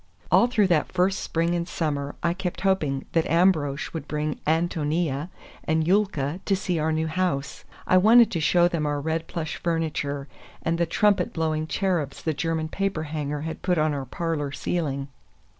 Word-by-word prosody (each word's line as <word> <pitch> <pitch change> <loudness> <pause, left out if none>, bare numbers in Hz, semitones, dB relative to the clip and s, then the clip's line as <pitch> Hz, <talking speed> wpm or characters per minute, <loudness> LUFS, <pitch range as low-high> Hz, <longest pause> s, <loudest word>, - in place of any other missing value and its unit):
All 235 - +6
through 220 -4 +3
that 170 -5 +1
first 185 +2 +1
spring 165 +1 0
and 170 -1 -1
summer 145 -5 -2
I 170 0 +2
kept 180 -1 -4
hoping 155 -9 +1
that 165 -1 +1
Ambrosch 160 -4 +2
would 160 -3 -5
bring 150 0 -2
Ántonia 160 -1 0 0.3
and 160 -1 +1
Yulka 180 -6 +1
to 195 - +2
see 185 -3 -1
our 155 +1 +1
new 160 0 0
house. 155 -4 -2 0.2
I 185 - +4
wanted 225 +5 +6
to 170 - -1
show 175 +3 +4
them 165 -4 -1
our 145 0 -1
red 160 +2 -2
plush 160 -2 -4
furniture, 150 -4 -2 0.4
and 165 +1 0
the 170 - +2
trumpet 200 +1 +2
blowing 155 -1 -1
cherubs 170 -7 -1
the 160 - 0
German 160 +1 -1
paper 195 -3 -1
hanger 150 -1 -3
had 160 +1 -5
put 180 -2 +1
on 155 -1 +2
our 140 -2 -3
parlor 150 0 -2
ceiling. 140 -3 -2
160 Hz, 175 wpm, -25 LUFS, 150-180 Hz, 0.4 s, All